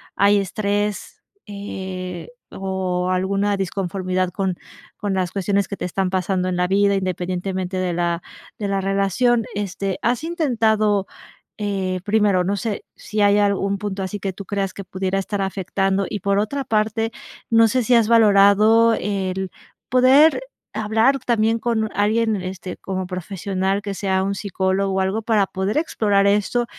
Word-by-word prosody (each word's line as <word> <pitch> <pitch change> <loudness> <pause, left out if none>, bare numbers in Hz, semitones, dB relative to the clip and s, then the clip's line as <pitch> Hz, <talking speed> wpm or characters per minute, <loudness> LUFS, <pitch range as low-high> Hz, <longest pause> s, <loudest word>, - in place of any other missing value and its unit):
hay 200 +1 +4
estrés, 205 +1 -2 0.2
eh, 190 -3 -6 0.2
o 185 -2 -2
alguna 195 +2 +1
disconformidad 185 -1 -2
con 190 0 -2 0.4
con 205 -2 -2
las 185 -2 -1
cuestiones 200 0 0
que 200 - -5
te - - -4
están 185 +1 -1
pasando 185 0 0
en 180 - -1
la 180 0 +1
vida, 200 +1 +3
independientemente 185 0 -2
de 185 -1 -1
la 170 0 -1 0.4
de 205 - -2
la 195 -1 0
relación, 200 +5 +1
este, 195 -1 -3
¿has 245 +3 0
intentado?, 220 - +1 0.5
eh, 190 -3 -2
primero, 205 -3 +2
no 200 +3 -1
sé 215 0 -3
si 210 0 -3
hay 205 0 +5
algún 200 -1 +1
punto 200 -1 -4
así 190 +2 -4
que 195 -1 -3
tú 200 - -8
creas 195 -1 -2
que 200 - -7
pudiera 190 +1 -2
estar 200 +1 -3
afectando? 195 0 -1
Y 205 - -3
por 200 +1 +1
otra 275 +7 -2
parte, 220 0 0 0.4
no 230 0 +6
sé 250 +3 +1
si 245 - +2
has 230 -2 +5
valorado 220 +1 +5
el 190 -2 -2 0.4
poder 265 - +5 0.3
hablar 220 +6 +2
también 230 -2 +1
con 220 -2 -1
alguien, 220 +1 +2
este, 185 0 -6
como 190 -1 -4
profesional, 190 +2 -2
que 200 -2 -4
sea 190 -1 0
un 195 +1 -1
psicólogo 195 -1 -1
o - - +1
algo 190 +4 0
para 215 -2 +2
poder 190 +5 -2
explorar 205 -10 +2
esto, 210 +4 +2
200 Hz, 155 wpm, -21 LUFS, 190-215 Hz, 0.5 s, no